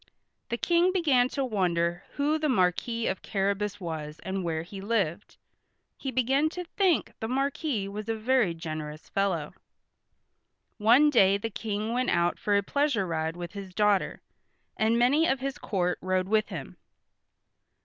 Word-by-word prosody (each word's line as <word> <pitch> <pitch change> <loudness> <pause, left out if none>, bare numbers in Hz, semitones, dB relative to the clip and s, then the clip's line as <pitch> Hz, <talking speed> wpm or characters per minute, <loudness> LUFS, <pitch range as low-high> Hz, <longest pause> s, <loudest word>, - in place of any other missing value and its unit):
The 235 - -1
King 345 +6 +3
began 285 -9 +3
to 275 0 -1
wonder 175 -6 0
who 295 +2 +1
the 305 -1 0
Marquis 225 +2 +1
of 190 - -1
Carrabas 200 +1 -1
was 155 -4 -5
and 190 0 -3
where 160 -2 -2
he 195 +3 -9
lived. 200 -4 -1 0.6
He 270 - -5
began 265 +4 +2
to 360 - -2
think 360 -1 +1
the 220 - -3
Marquis 270 -3 -1
was 210 +2 -6
a 225 - +1
very 220 -5 +2
generous 155 -2 -6
fellow. 180 -6 -1 1.3
One 245 +8 +6
day 200 -6 +5
the 225 +3 -4
King 215 +1 -3
went 255 +1 0
out 170 0 +1
for 205 -1 +2
a 200 - +1
pleasure 280 -4 +1
ride 160 -1 -2
with 175 -1 -6
his 195 -3 -8
daughter, 210 -2 +2 0.5
and 225 +2 +2
many 280 +7 +4
of 265 - +1
his 275 +2 -4
court 180 -7 -1
rode 185 0 0
with 215 +1 +2
him. - - -7
210 Hz, 160 wpm, -28 LUFS, 180-260 Hz, 1.3 s, One